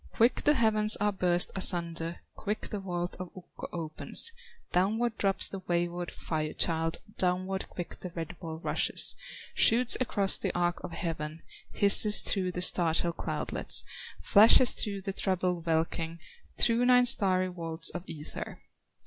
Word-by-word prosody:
Quick 235 Hz, +3 st, +1 dB
the 295 Hz, -, +3 dB
heavens 215 Hz, -3 st, +2 dB
are 210 Hz, 0 st, -1 dB
burst 180 Hz, -2 st, +1 dB
asunder, 170 Hz, -3 st, 0 dB
Quick 210 Hz, 0 st, -6 dB
the 210 Hz, -, -4 dB
vault 175 Hz, -2 st, -5 dB
of 185 Hz, -1 st, -7 dB
Ukko 180 Hz, -, -11 dB
opens, 165 Hz, -, 0 dB, 0.4 s
Downward 220 Hz, +6 st, -1 dB
drops 195 Hz, -1 st, +1 dB
the 195 Hz, -, -8 dB
wayward 175 Hz, -1 st, -3 dB
Fire 155 Hz, -1 st, -5 dB
child, 165 Hz, 0 st, -2 dB, 0.2 s
Downward 185 Hz, +1 st, -2 dB
quick 175 Hz, -, -9 dB
the 180 Hz, -, -8 dB
red 165 Hz, +1 st, -6 dB
ball 160 Hz, -3 st, -8 dB
rushes, 160 Hz, -, 0 dB, 0.4 s
Shoots 240 Hz, +2 st, +5 dB
across 200 Hz, -6 st, +2 dB
the -, -, -3 dB
arch 175 Hz, 0 st, -1 dB
of 170 Hz, -, -8 dB
heaven, 160 Hz, -2 st, -6 dB, 0.3 s
Hisses 205 Hz, +1 st, +5 dB
through 185 Hz, -3 st, -1 dB
the 180 Hz, -, 0 dB
startled 170 Hz, -1 st, +4 dB
cloudlets, -, -, -1 dB, 0.4 s
Flashes 225 Hz, +4 st, +5 dB
through 200 Hz, -3 st, -3 dB
the 195 Hz, 0 st, -5 dB
troubled 180 Hz, -3 st, -3 dB
welkin, 165 Hz, 0 st, -2 dB, 0.4 s
Through 235 Hz, +1 st, +2 dB
nine 250 Hz, 0 st, +4 dB
starry 185 Hz, -6 st, +4 dB
vaults 165 Hz, -2 st, 0 dB
of 175 Hz, -, -7 dB
ether. 150 Hz, -1 st, -9 dB
180 Hz, 145 wpm, -28 LUFS, 170-205 Hz, 0.4 s, Shoots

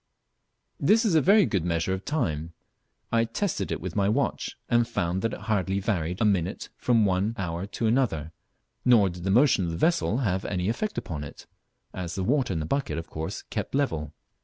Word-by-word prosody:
This 225 Hz, +2 st, +4 dB
is 205 Hz, -, +2 dB
a 160 Hz, -, +5 dB
very 200 Hz, +4 st, +6 dB
good 95 Hz, -6 st, 0 dB
measurer 85 Hz, +1 st, 0 dB
of 95 Hz, +1 st, -5 dB
time. 85 Hz, -, -2 dB, 0.6 s
I 115 Hz, 0 st, +3 dB
tested 115 Hz, -, -2 dB
it 80 Hz, -, -2 dB
with 90 Hz, 0 st, -6 dB
my 100 Hz, -1 st, +2 dB
watch 135 Hz, +6 st, -1 dB
and 120 Hz, -1 st, +3 dB
found 90 Hz, -5 st, -1 dB
that 115 Hz, -, 0 dB
it -, -, -7 dB
hardly 100 Hz, -3 st, 0 dB
varied 90 Hz, -3 st, -1 dB
a -, -, +2 dB
minute 95 Hz, -3 st, 0 dB
from 115 Hz, -3 st, +2 dB
one 100 Hz, +4 st, +1 dB
hour 90 Hz, -1 st, -3 dB
to 115 Hz, -, -3 dB
another, 110 Hz, -, +1 dB, 0.5 s
nor 115 Hz, -6 st, +5 dB
did 85 Hz, +1 st, -8 dB
the -, -, 0 dB
motion 115 Hz, -3 st, +4 dB
of -, -, -2 dB
the 85 Hz, -, -3 dB
vessel 170 Hz, -, +2 dB
have 95 Hz, -8 st, 0 dB
any 90 Hz, 0 st, -1 dB
effect 215 Hz, -, -2 dB
upon 75 Hz, -4 st, -4 dB
it, 70 Hz, -, -10 dB, 0.5 s
as 90 Hz, -2 st, -5 dB
the 95 Hz, -, -2 dB
water 130 Hz, +2 st, +1 dB
in 85 Hz, -, -1 dB
the 75 Hz, -, -2 dB
bucket 140 Hz, -, -1 dB
of 85 Hz, -, -6 dB
course 80 Hz, +1 st, -5 dB
kept -, -, -3 dB
level. 80 Hz, -, 0 dB
100 Hz, 205 wpm, -27 LUFS, 85-120 Hz, 0.6 s, very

